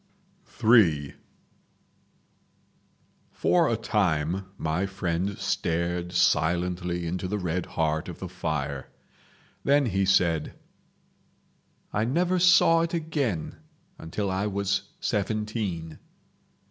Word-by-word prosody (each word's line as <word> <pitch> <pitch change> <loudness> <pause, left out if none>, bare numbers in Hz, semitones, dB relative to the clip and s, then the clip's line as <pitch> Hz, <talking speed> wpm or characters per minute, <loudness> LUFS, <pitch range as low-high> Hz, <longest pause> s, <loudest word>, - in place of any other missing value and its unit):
III 85 - +4 2.2
For 170 -3 +2
a 115 - +1
time 95 -5 0
my 85 +5 -1
friend 95 0 -2
stared 85 +1 -1
silently 90 +1 +1
into 90 +2 -3
the 105 +3 -2
red 90 -2 -2
heart 80 +1 -1
of 85 - -7
the 95 - -6
fire. 75 -6 -3 0.8
Then 140 0 +3
he 100 -4 +1
said: 85 -5 +2 1.4
"I 105 +2 +1
never 175 +8 +1
saw 170 -2 +6
it 170 +1 -1
again 145 - -2 0.4
until 95 +5 -3
I 95 +2 -1
was 100 0 -1
seventeen. 105 -6 -2
95 Hz, 95 wpm, -26 LUFS, 85-110 Hz, 2.2 s, saw